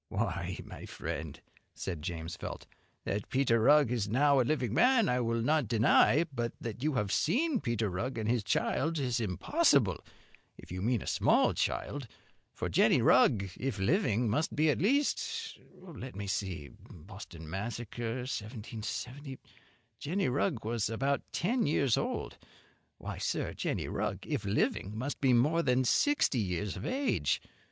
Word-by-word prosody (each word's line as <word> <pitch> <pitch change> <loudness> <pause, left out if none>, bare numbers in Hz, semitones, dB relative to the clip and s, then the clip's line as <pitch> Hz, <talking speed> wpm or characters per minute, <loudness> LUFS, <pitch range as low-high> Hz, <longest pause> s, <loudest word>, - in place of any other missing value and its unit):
"Why, - - -2
my - - -9
friend," - - -5 0.4
said 85 -5 -5
James 85 0 -5
Felt, - - -7 0.4
"that 100 0 -3
Peter 130 -3 +2
Rugg 145 +2 +5
is 110 -5 -1
now 140 +4 +4
a - - +5
living 125 -3 0
man 250 - +4
I 125 - +1
will 115 -1 0
not 150 -1 +2
deny; 120 +7 +4
but 120 -2 -2
that 115 0 -6
you 150 0 0
have 105 -4 0
seen 260 - +1
Peter 115 -3 -1
Rugg 95 +8 -3
and 110 -1 -2
his 120 -2 +1
child 160 +10 0
is 125 -4 0
impossible, 115 - +2 0.5
if - - -13
you 90 0 -4
mean 115 +1 0
a - - -11
small - - +3
child, 140 -3 -2 0.4
for - - -4
Jenny - - +4
Rugg, 100 -4 +4
if 130 -4 -2
living, 120 - +1
must 145 +9 0
be 155 +1 +4
at - - -2
least 290 - 0 0.2
let 145 -9 -9
me 100 +1 -5
see 95 -6 -3 0.2
Boston 85 -2 -11
Massacre, 115 +5 -4
1770 125 +4 -5 0.6
Jenny 180 +5 -1
Rugg 130 - -1
was 115 -2 -1
about 135 +5 0
ten 230 - 0
years 140 -5 +2
old. - - -3 0.6
Why, - - -6
sir, - - -2
Jenny - - -2
Rugg - - -3
if 105 - -3
living 100 0 0
must 130 +5 -4
be 135 -2 +4
more 145 +8 +3
than 130 -3 +2
sixty 215 - +2
years 95 0 -2
of - - -5
age. 270 +2 0
120 Hz, 155 wpm, -31 LUFS, 105-145 Hz, 0.6 s, Rugg